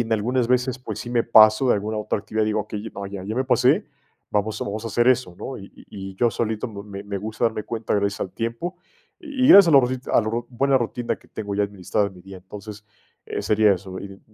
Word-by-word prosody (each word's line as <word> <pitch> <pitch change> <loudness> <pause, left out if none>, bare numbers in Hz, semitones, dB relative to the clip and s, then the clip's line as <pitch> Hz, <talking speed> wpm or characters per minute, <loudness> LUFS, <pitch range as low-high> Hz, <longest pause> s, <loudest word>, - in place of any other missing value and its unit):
en 115 -1 -1
algunas 120 +3 +1
veces, 125 0 +1
pues, 110 -4 -6
sí 120 - -6
me 120 -1 +2
paso 110 +2 +6
de - - +5
alguna 105 +2 -3
otra 105 - -1
actividad, 110 +1 -1
digo: 110 0 0
"Okey, 105 +1 -7
ah, 100 0 -5
ya 100 -2 -7
ya 110 +4 -5
me 130 - +1
pasé, 130 - +3 0.4
vamos 105 +1 -1
vamos 105 +2 -4
a - - -3
hacer 120 +3 +1
eso, 125 -9 +2
¿no?". 135 - -6
Y 100 - -12
y 95 -1 -10
yo 120 +4 +3
solito 110 0 -2
me 100 -2 -8
me 100 -1 -4
gusta 110 +3 -3
darme 110 -2 0
cuenta 115 -1 -3
gracias 100 0 0
al 95 - -4
tiempo. 115 +11 -4 0.5
Y 265 -4 0
gracias 195 -7 +9
a - - +5
los 140 - +8
rosit 130 +1 -3
a - - +4
lo 110 - -2
ro 120 0 -2
buena 135 +2 +2
rutina 120 -1 -1
que - - -24
tengo 100 -2 -5
ya 105 - +1
administrada 100 0 -1
en 95 - -16
mi 90 - -15
día. 95 0 -11
Entonces, 105 +3 -10 0.4
eh, - - -4
sería 105 -1 +3
eso, 95 0 -8
y - - -6
y 95 - -20
110 Hz, 245 wpm, -23 LUFS, 100-120 Hz, 0.5 s, gracias